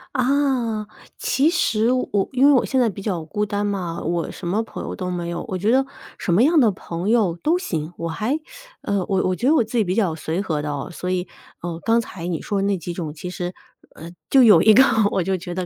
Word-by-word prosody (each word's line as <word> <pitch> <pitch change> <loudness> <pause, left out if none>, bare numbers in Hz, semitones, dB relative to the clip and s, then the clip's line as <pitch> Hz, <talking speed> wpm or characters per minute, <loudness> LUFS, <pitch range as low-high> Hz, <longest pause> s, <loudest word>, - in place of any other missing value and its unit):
啊， 255 -5 +1 0.3
其 285 +4 +2
实 235 -9 +1
我 210 -6 0
因 260 +2 +4
为 290 - +7
我 255 - +4
现 265 - 0
在 240 - +4
比 200 -1 -5
较 180 -6 -3
孤 210 +5 -2
单 205 0 -1
嘛， 185 -5 -3
我 170 +1 -1
什 175 - -7
么 205 +5 +1
朋 225 - -7
友 - - -5
都 185 -3 -4
没 175 -1 -3
有， 170 - -4
我 185 - -3
觉 210 +5 +1
得 265 +1 +4 0.4
什 180 - -2
么 200 +8 +4
样 315 +2 +4
的 230 -5 +5
朋 180 +1 -5
友 210 -8 +2
都 335 +4 +2
行， 160 - -4
我 170 - -3
还， 250 - -1 0.4
呃， 200 -1 -1
我 190 -1 +1
我 185 - 0
觉 245 - -1
得 315 - +5
我 240 - +4
自 225 +3 -8
己 225 - +4
比 185 +1 -2
较 190 -8 +1
随 160 +2 -3
和 155 -7 -2
的 150 0 -3
哦， 140 -1 -4
所 180 +3 -5
以， 180 0 -1 0.3
呃， 170 -1 -5
刚 230 +1 +3
才 180 -6 -6
你 170 -3 -2
说 200 -2 -1
的 200 - 0
那 200 -2 +1
几 175 0 -6
种， 165 -4 -4
其 180 +4 -7
实， 180 0 -5 0.4
呃， 165 +2 -10 0.2
就 265 -2 +6
有 205 -8 +7
一 220 - +6
个 265 - +8 0.3
我 185 - 0
就 190 +1 0
觉 175 0 -6
得 185 -1 -2
195 Hz, 270 characters per minute, -22 LUFS, 175-235 Hz, 0.4 s, 个